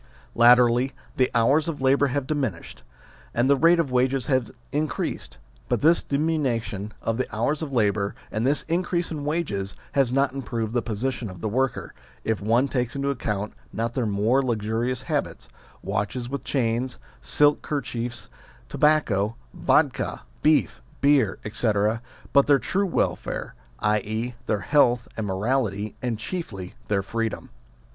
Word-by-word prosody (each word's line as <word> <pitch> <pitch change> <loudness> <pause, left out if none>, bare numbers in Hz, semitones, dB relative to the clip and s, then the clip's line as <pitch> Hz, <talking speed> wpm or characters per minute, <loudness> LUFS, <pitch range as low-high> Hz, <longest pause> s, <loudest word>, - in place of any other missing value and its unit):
Latterly 125 +2 +5 0.2
the 130 -1 +3
hours 140 +7 +4
of 165 -3 -3
labour 135 +2 +3
have 140 +1 -1
diminished, 130 - -3 0.5
and 120 +2 +3
the 140 - +5
rate 165 +5 +5
of 150 -6 0
wages 130 0 +2
has 130 -4 +1 0.2
increased; 145 - -2 0.3
but - - +1
this 165 +3 +5
diminution 130 -9 -1
of 115 0 0
the 130 - -1
hours 140 +8 0
of 155 -3 -4
labour 105 -4 +1 0.2
and 110 - -1
this 140 +3 +2
in 170 +2 0
crease 175 -2 -2
in 150 -3 -4
wages 125 - -2 0.2
has 135 -3 +2
not 135 0 +2
improved 115 -5 -3
the 120 - +2
position 120 +1 -2
of 90 -1 -10
the 110 - -2
worker, 125 +3 -1 0.3
if 110 -2 -1
one 115 +6 +3
takes 125 -2 -2
into 140 0 0
account 105 -5 -3 0.2
not 115 +1 -2
their 120 -3 0
more 105 +6 +2
luxurious 115 0 -1
habits - - -3 0.4
watches 120 +4 -2
with 135 0 -4
chains, 125 -1 -1 0.2
silk 145 0 +3
kerchiefs, 120 -5 -3 0.4
tobacco, 115 -9 +2 0.2
vddka, - - +1 0.2
beef, 155 0 +2 0.2
beer, 140 -8 +3
etc. 110 0 +1 0.3
but 140 -1 +5
their 145 -1 +6
true 195 - 0
welfare, 175 - -2 0.3
i.e. 110 +3 0
their 105 -2 0
health 125 -4 +3
and 110 -2 -3
morality, 105 +1 -1
and 120 -3 -1
chiefly 105 - -5
their 100 -2 +1
freedom. 115 +2 -3
125 Hz, 150 wpm, -25 LUFS, 110-140 Hz, 0.5 s, their